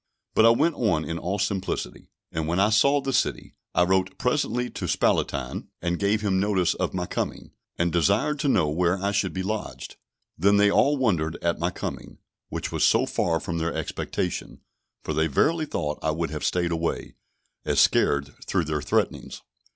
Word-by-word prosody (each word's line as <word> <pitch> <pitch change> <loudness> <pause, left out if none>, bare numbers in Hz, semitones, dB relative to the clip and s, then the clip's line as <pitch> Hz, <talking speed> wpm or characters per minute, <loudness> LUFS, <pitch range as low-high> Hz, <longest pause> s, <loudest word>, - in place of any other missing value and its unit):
But 110 - +6
I - - +8
went 150 +9 +3
on 90 - 0
in 85 0 -4
all 95 +4 -2
simplicity, 100 -1 -3 0.2
and 80 -1 -2
when 85 +3 0
I 105 +2 +4
saw 140 +6 +4
the 135 0 -2
city, - - -1 0.2
I 90 - +5
wrote 95 +1 +1
presently 125 -2 0
to - - -4
Spalatine, - - 0
and 85 0 -2
gave 105 +1 +1
him 95 -3 +1
notice 95 -3 +2
of - - -3
my 90 -1 -1
coming, - - -4 0.3
and 85 0 +1
desired 100 - +2
to 145 - 0
know 90 - +3
where 85 +4 +1
I 100 +1 -1
should 100 -2 0
be 95 - -3
lodged. 105 +2 -5 0.4
Then 100 +4 +4
they 100 0 +5
all 145 +6 +3
wondered 85 -11 0
at 85 0 0
my 85 - +1
coming, - - -6 0.3
which - - -4
was - - 0
so - - +4
far 80 -1 0
from 85 0 -3
their 85 +1 -2
expectation; - - -4 0.4
for 80 - -3
they 80 +2 +2
verily 155 - +1
thought 75 - -3
I 80 - 0
would 80 0 -2
have 75 - -5
stayed 85 -1 0
away, 85 0 -2 0.5
as - - +1
scared 70 0 +3
through 90 -4 +1
their 75 -1 -2
threatenings. - - -1
95 Hz, 190 wpm, -25 LUFS, 85-105 Hz, 0.5 s, I